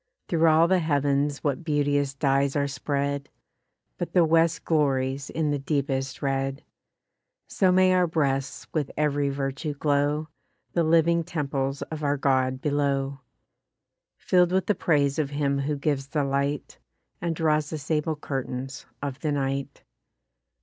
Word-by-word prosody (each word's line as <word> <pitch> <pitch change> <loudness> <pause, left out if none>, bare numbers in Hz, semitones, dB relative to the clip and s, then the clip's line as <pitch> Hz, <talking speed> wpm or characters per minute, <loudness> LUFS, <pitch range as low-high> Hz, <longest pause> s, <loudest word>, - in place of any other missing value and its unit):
Through 165 -1 +3
all 160 +1 +5
the 185 +1 +3
heav'ns 145 -2 0
what 145 +2 -1
beauteous 145 -2 +1
dyes 135 0 +1
are 140 -1 +1
spread! 140 0 -2 0.7
But 175 - -4
the 175 -2 +5
west 165 0 +2
glories 135 -3 +1
in 155 -2 -1
the 145 - -1
deepest 135 -2 -2
red: 135 0 -1 0.8
So 190 -2 +2
may 185 0 +5
our 180 -1 +3
breasts 140 -5 -1
with 150 -4 -1
ev'ry 145 -1 +1
virtue 140 +2 -3
glow, 145 +2 0 0.4
The 170 - +2
living 165 +1 +3
temples 140 -4 -2
of 155 -1 -7
our 145 0 +1
God 130 -1 +1
below! 140 -1 0 1.0
Fill'd 180 -1 +3
with 190 0 +2
the 210 - +2
praise 145 -6 +1
of 145 -3 0
him 140 -1 0
who 145 +2 -1
gives 140 -1 -1
the 145 +1 0
light, 140 +1 -2 0.4
And 170 -2 -1
draws 155 -2 +1
the 160 - -4
sable 155 +1 -1
curtains 135 -2 -5 0.2
of 140 -1 -4
the 150 +1 -1
night. 135 -1 -2
145 Hz, 145 wpm, -26 LUFS, 135-155 Hz, 1.0 s, all